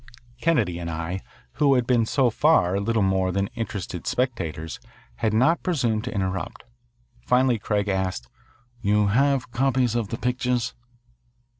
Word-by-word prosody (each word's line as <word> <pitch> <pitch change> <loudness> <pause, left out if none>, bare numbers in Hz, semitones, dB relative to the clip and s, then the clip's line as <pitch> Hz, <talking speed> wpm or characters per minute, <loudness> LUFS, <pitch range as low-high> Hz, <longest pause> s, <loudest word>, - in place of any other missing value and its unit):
Kennedy 150 - +1
and 85 -1 -4
I, 85 +3 -4 0.4
who 140 -2 +5
had 125 -2 +2
been 120 -3 +2
so 130 -3 +2
far 100 - +3
little 110 +1 +1
more 95 -1 +1
than 100 +1 -1
interested 110 -7 -5
spectators, 85 -11 -2 0.4
had 110 - 0
not 130 +10 +3
presumed 120 -11 0
to 125 - -4
interrupt. 95 -2 -3 0.6
Finally 125 -2 +3
Craig 105 -1 -1
asked, 95 -10 -2 0.5
"You 105 -1 +2
have 130 +2 +2
copies 130 -1 +1
of 120 -3 -1
the 115 - -4
pictures?" 125 -1 -1
115 Hz, 140 wpm, -24 LUFS, 95-125 Hz, 0.6 s, who